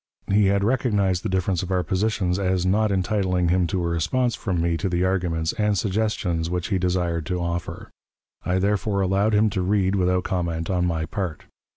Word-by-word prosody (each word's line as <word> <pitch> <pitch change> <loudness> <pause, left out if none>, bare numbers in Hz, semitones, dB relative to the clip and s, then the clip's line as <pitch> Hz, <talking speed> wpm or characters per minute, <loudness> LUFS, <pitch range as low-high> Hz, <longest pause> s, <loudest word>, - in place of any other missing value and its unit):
He 105 -1 +4
had 100 0 +2
recognized 105 -6 +1
the - - -3
difference 95 -1 0
of 95 - -5
our 90 -1 +1
positions 95 +1 0
as 95 -2 0
not 105 +3 +2
entitling 95 -2 0
him 90 0 +2
to 95 -1 -1
a - - 0
response 85 +10 0
from 95 -6 -2
me 85 0 +1
to 95 +3 -2
the 90 0 0
arguments 85 -4 0
and 105 -1 +2
suggestions 95 -4 -1
which 90 -1 -2
he 95 -3 +1
desired 85 -3 -1
to 90 -1 -1
offer. 85 0 -4 0.5
I 90 - 0
therefore 100 +1 0
allowed 100 +3 +2
him 105 0 +3
to 95 - -1
read 95 0 +1
without 90 -1 +1
comment 85 -2 -2
on 90 -1 +1
my 80 -2 -1
part. 85 -1 -4
95 Hz, 195 wpm, -23 LUFS, 85-100 Hz, 0.5 s, He